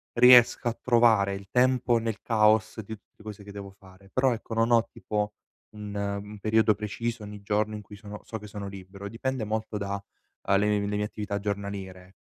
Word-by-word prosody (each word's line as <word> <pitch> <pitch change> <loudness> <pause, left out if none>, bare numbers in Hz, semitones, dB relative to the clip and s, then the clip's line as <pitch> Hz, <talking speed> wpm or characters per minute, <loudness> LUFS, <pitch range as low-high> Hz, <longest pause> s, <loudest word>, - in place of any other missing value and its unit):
riesca 125 0 +7
a 115 - -2
trovare 115 -5 +4
il 100 0 -7
tempo 125 -1 +3
nel 115 -2 -3
caos 110 -1 +3
di 110 +2 -7
tutte 105 0 -22
cose 105 -1 -8
che 100 - -10
devo 100 -1 -8
fare. 95 0 -18
Però 130 0 +3
ecco 115 0 -5
non 115 +1 +2
ho, 115 -1 +5
tipo, 105 0 -3 0.4
un 105 -1 -8
un 100 +1 -4
periodo 110 0 +3
preciso, 110 +2 -4
ogni 105 -1 -9
giorno 105 +1 0
in 105 - -5
cui 105 0 -12
sono 105 +1 -9
so 110 - -6
che 105 - -11
sono 100 -1 -6
libero. 100 +1 -9
Dipende 125 +2 -3
molto 110 0 -3
da, 100 0 -2 0.5
uhm, 100 0 +4
le 105 - +2
mie 105 -1 +1
le 105 - -2
mie 105 - 0
attività 105 -1 -4
giornaliere. 100 -2 -5
105 Hz, 200 wpm, -27 LUFS, 100-110 Hz, 0.5 s, riesca